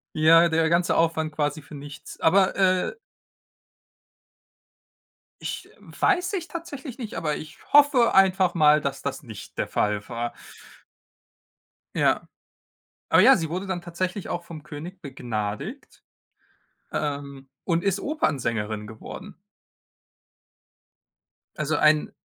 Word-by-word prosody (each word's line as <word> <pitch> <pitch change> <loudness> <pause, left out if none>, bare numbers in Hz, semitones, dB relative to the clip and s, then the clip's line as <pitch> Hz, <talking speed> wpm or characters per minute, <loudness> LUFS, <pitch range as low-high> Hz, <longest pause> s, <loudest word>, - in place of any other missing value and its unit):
Ja, 165 +2 +6
der 160 0 +2
ganze 170 +1 +2
Aufwand 160 -1 +1
quasi 150 0 -1
für 145 - -13
nichts. 145 0 -10
Aber, 190 +3 +4
äh 185 -1 +2 2.5
Ich - - -5
weiß 365 0 0
ich 350 -4 -3
tatsächlich 305 -7 -7
nicht, 230 -3 -6
aber 150 -2 -1
ich 155 - -9
hoffe 285 -4 +6
einfach 190 -2 +4
mal, 150 -2 +5
dass 140 -1 -4
das 140 +1 -4
nicht 110 -5 -11
der - - 0
Fall 105 -1 -1
war. 120 0 -3 1.6
Ja. - - +2 0.8
Aber - - +6
ja, - - +8
sie 160 -2 -3
wurde 185 +4 -3
dann 185 -2 -3
tatsächlich 180 +3 -4
auch 175 - -3
vom 160 -3 -10
König 165 +6 -9
begnadigt, 125 - -5 0.9
ähm, 140 -2 -4 0.2
und 170 -2 +1
ist 200 0 +1
Opernsängerin 115 - -1
geworden. 175 - -10 2.2
Also, 150 0 0
ein 155 0 +3
160 Hz, 115 wpm, -25 LUFS, 140-190 Hz, 2.5 s, ja